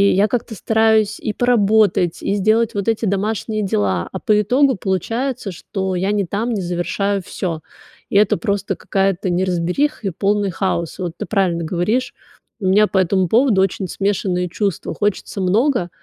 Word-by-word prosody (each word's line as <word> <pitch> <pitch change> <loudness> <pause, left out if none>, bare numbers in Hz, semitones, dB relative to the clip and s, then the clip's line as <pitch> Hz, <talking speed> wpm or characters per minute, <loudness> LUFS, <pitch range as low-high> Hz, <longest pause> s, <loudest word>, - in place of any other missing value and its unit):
я 205 +2 +4
как-то 225 0 -3
стараюсь 220 0 +2
и 215 - -3
поработать, 215 -7 +2
и 200 - 0
сделать 215 +3 +2
вот 200 +1 -3
эти 225 0 +1
домашние 215 +2 -1
дела, 95 - 0
а - - -5
по 210 -1 +2
итогу 260 +5 +3
получается, 225 - -2
что 190 +2 -4
я 190 +3 0
не 205 -2 0
там, 215 +7 -2
не 210 -4 -1
завершаю 185 +3 -1
всё. 165 -4 -4 0.5
И - - -3
это 205 -1 +4
просто 200 -3 -2
какая-то 195 -1 -1
неразбериха 185 - 0
и 190 - -1
полный 200 +2 0
хаос. 170 -2 -2
Вот 175 -3 -3
ты - - -4
правильно 185 -5 0
говоришь. 210 +10 -1 0.5
У 190 - -1
меня 205 +3 +5
по 190 - +1
этому 185 0 +2
поводу 225 -2 +3
очень 190 0 -1
смешанные 190 -2 -1
чувства. 195 0 -2
Хочется 205 -1 -2
много, 205 +1 +1
200 Hz, 165 wpm, -19 LUFS, 185-220 Hz, 0.5 s, меня